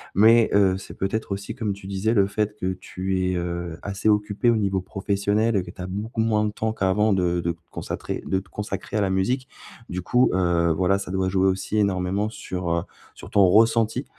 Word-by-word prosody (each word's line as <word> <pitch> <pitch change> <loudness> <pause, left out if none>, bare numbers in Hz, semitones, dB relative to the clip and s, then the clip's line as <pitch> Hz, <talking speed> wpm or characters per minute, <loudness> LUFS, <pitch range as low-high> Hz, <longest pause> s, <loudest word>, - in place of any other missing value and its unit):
mais 110 +3 +6
heu, 95 -2 +4
c'est 95 - -10
peut-être 100 +2 -2
aussi, 100 0 -6
comme 110 -6 -2
tu 95 -1 -11
disais, 100 +3 0
le 100 -4 +4
fait 105 +1 -2
que 95 -3 -2
tu 95 +1 -3
es, - - -1
heu, 85 -1 -3
assez 100 +1 -3
occupé 105 +2 +2
au 120 - +4
niveau 100 -3 0
professionnel 100 +3 0
et 95 - 0
que - - -9
tu 95 - -11
as 90 - -4
beaucoup 105 +4 -3
moins 110 -1 +2
de 105 - -1
temps 110 +1 -1
qu'avant 105 +1 +1
de 90 -2 +1
de 85 - 0
te 85 - -9
consacrer - - -5
de 95 - 0
te 95 - -14
consacrer 105 +1 -5
à 105 - +2
la 100 - +1
musique. 125 +8 0 0.4
Du 90 +1 -3
coup, 125 +8 +3
heu, 85 -2 +2
voilà, 90 +4 +2
ça 100 - -6
doit 95 0 0
jouer 95 0 +2
aussi 95 +2 -2
énormément 100 +1 0
sur, 95 -5 -4
heu, 85 0 0 0.3
sur - - -12
ton 100 -1 +5
ressenti 115 +5 +3
100 Hz, 220 wpm, -24 LUFS, 95-105 Hz, 0.4 s, mais